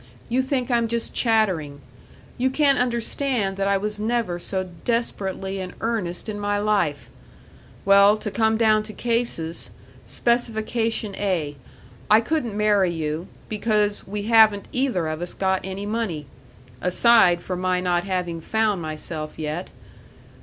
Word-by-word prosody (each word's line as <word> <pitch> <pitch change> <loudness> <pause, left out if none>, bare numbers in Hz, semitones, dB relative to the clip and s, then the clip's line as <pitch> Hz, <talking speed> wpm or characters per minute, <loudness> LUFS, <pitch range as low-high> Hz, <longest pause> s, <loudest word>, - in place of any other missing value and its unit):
You 250 +3 +2
think 260 -1 -1
I'm 235 -1 +2
just 235 0 -2
chattering. 190 - +1 0.6
You 260 +1 +2
can't 280 0 +3
understand 235 -3 0
that 195 0 0
I 200 0 +3
was 210 +1 -3
never 220 -5 -1
so 185 +1 -3 0.2
desperately 195 -5 -2
in 185 -1 -6
earnest 215 -7 -2
in 210 -1 -4
my 205 0 0
life. 200 -9 0 0.8
Well, 200 +1 +6
to 210 -1 -5
come 220 +1 +2
down 215 -1 +4
to - - -7
cases. 230 -10 -2 0.4
Specification 225 -2 -1
A 170 -8 -1 0.5
I 215 - +7
couldn't 235 -4 -2
marry 205 -4 +3
you, 160 +1 -3 0.2
because 210 -1 0
we 205 +1 -4
haven't 220 -2 +5
either 250 -11 0
of 155 +1 -4
us 175 - -6
got 190 -1 +1
any 190 +1 -5
money 205 -9 -2 0.6
aside 180 -2 +4
from 180 -1 -4
my 185 0 +1
not 175 -1 +1
having 180 -4 -2
found 215 -1 0
myself 155 0 -5
yet. 155 +3 -4
205 Hz, 140 wpm, -23 LUFS, 180-230 Hz, 0.8 s, I